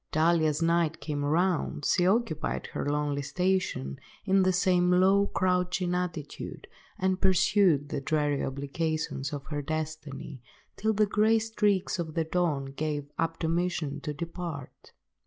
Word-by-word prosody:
Duly 160 0 +3
as 155 +2 0
night 165 -1 +2
came 145 -2 -3
round, 160 -1 0
she 180 -1 +3
occupied 200 -5 0
her - - -2
lonely 145 -1 0
station, 180 - -1 0.3
in 195 0 +4
the 185 0 +3
same 180 -1 +3
low 190 +3 +4
crouching 180 -1 0
attitude, 175 -5 -4 0.3
and 190 0 0
pursued 185 -5 +3
the 140 - -3
dreary 145 0 0
obligations 140 +1 -2
of 140 -2 -5
her 145 -1 -2
destiny, 155 -2 -5 0.3
till 220 +1 0
the 215 +1 +3
grey 215 +2 +3
streaks 210 -4 0
of 160 -2 -4
the 165 - +2
dawn 160 -4 0
gave 145 -2 -3
admonition 165 -2 -1
to 150 - -4
depart. 165 -2 -7
165 Hz, 140 wpm, -28 LUFS, 150-185 Hz, 0.3 s, in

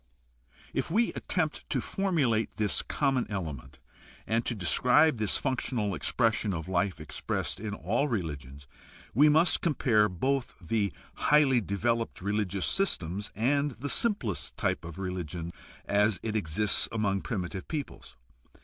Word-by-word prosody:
If - - -1
we 225 +8 +2
attempt 155 -5 -2
to 135 - 0
formulate 140 - 0
this 105 -2 +1
common 135 -4 0
element 80 - -5 0.5
and 115 +1 0
to 120 - -1
describe 125 - +4
this 105 -3 +1
functional 125 -6 -1
expression 110 -4 0
of 80 0 -5
life 90 -1 0
expressed 75 +4 -3
in 105 0 -4
all 145 - 0
religions, 70 - -5 0.5
we 150 +6 +6
must 160 +4 +3
compare 115 -10 +2
both 130 +8 -1
the 100 +3 -1 0.4
highly 140 -5 +5
developed 115 +4 -1
religious 100 -1 -1
systems 100 - 0
and 140 +6 +1
the 135 +5 -5
simplest 200 - +1
t} - - +1
pe 85 - -11
of 85 - -9
religion 90 -3 -5 0.3
as 105 0 +2
it 110 -1 -3
exists 105 +1 +4
among 100 -3 0
primitive 95 -5 -4
peoples. 140 - -6
110 Hz, 135 wpm, -29 LUFS, 95-135 Hz, 0.5 s, we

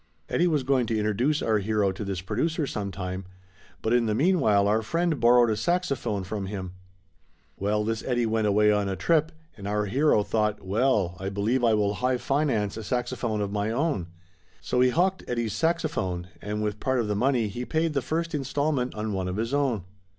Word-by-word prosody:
Eddie 175 - +2
was 150 -5 +1
going 130 -2 +2
to 110 - 0
introduce 110 +8 +1
our 110 -2 +2
hero 105 -1 +1
to 95 +3 -6
this 95 -2 -3
producer 145 - -1
sometime, 95 -5 -4 0.6
but 110 - +1
in 120 -2 +3
the 105 - +1
mean 180 - +3
while 100 -6 +3
our 110 +2 +2
friend 165 +5 0
borrowed 120 0 +5
a - - +1
saxophone 140 - -1
from 95 +1 -4
him. 95 -2 -5 0.8
Well, 105 +2 0
this 110 +1 -2
Eddie 120 -2 0
went 110 -1 +1
away 105 +1 +4
on 105 -1 +1
a 95 - -2
trip, 160 - +2 0.2
and 100 -1 -8
our 105 0 0
hero 125 0 +3
thought, 105 -2 -1
well, 100 -3 +1
I 95 +1 -3
believe 105 +6 0
I 115 -2 +4
will 105 -1 +1
high 125 +3 0
finance 125 -8 0
a 110 - -5
saxophone 115 0 -2
of 100 -1 -2
my 105 +1 -1
own. 120 - -1 0.5
So 80 +11 0
he 130 - +5
hocked 185 +7 +1
Eddie's 120 -3 -1
saxophone 105 - -1
and 105 +1 -3
with 105 0 -2
part 130 -1 0
of 115 - 0
the 105 - 0
money, 120 0 +2
he 120 +5 -5
paid 160 +4 0
the 140 - +1
first 165 +5 -2
installment 140 -2 -1
on 105 0 -3
one 95 -1 -2
of 90 +2 -3
his 115 +4 -2
own. 135 -9 +1
110 Hz, 200 wpm, -26 LUFS, 105-135 Hz, 0.8 s, borrowed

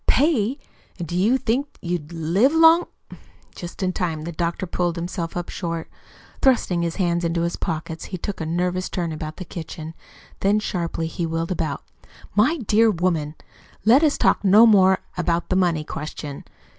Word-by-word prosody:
"Pay! 270 -4 +2 0.4
And 175 -3 -5
do 175 - -4
you 215 +8 +3
think 265 +3 0
you'd 170 -3 -4
live 170 - +2
long 325 +1 +6 0.3
" - - -28
Just 175 +2 -7
in 185 0 0
time 165 -4 -2
the 170 - -5
doctor 170 +2 -2
pulled 175 -1 -1
himself 170 0 -4
up 175 - -4
short. 165 -3 -4 0.5
Thrusting 230 -9 +3
his 170 -1 -2
hands 175 -3 0
into 170 0 0
his 170 - -1
pockets 160 -1 -4
he 185 - -5
took 190 +1 -5
a - - -2
nervous 180 +2 -1
turn 170 -3 -2
about 155 0 -6
the 185 - -6
kitchen; 160 -1 -7 0.5
then 205 +2 +3
sharply 170 -5 -2
he 165 +1 -3
wheeled 165 +2 -2
about. 160 -5 -2 0.5
"My 240 - +3
dear 225 -3 +3
woman, 165 -5 0 0.5
let 245 +6 +6
us 300 -2 +3
talk - - +2
no 205 +4 +7
more 190 -4 +6 0.2
about 170 0 0
the 185 - +1
money 175 -4 +2
question. 150 -2 -7
175 Hz, 175 wpm, -23 LUFS, 165-205 Hz, 0.5 s, no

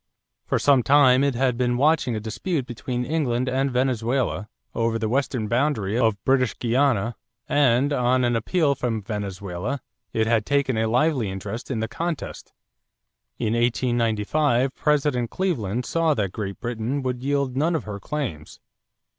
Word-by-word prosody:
For - - +1
some 140 -3 +4
time 135 0 +5
it 140 -3 +1
had 125 -1 +1
been 120 -1 +1
watching 140 -3 +2
a - - -2
dispute 130 - -3
between 125 0 -4
England 130 -5 0
and 135 +2 +1
Venezuela 125 -3 0 0.2
over 115 0 0
the 110 - -1
western 125 -2 -1
boundary 115 -4 0
of 110 -4 +1
British 130 -2 +2
Guiana 120 -3 +1 0.3
and, 140 0 +3
on 125 -1 +2
an 120 -1 +2
appeal 145 - +1
from 115 -5 -2
Venezuela, 100 +3 -4 0.3
it 110 - +1
had 115 -1 +2
taken 140 0 +1
a 110 0 +1
lively 125 -1 +1
interest 95 +5 -6
in 115 -5 -2
the 110 - -1
contest. 165 +7 -5 0.9
In 110 - -1
1895 120 +2 +1
President 145 -5 +1
Cleveland 125 - -1
saw 165 -2 +1
that 100 -4 -1
Great 100 -1 -5
Britain 120 +4 -3
would 125 -1 -2
yield 140 -1 0
none 160 +5 +1
of 155 - -2
her 105 -1 -6
claims. 100 - -5
125 Hz, 155 wpm, -24 LUFS, 110-140 Hz, 0.9 s, time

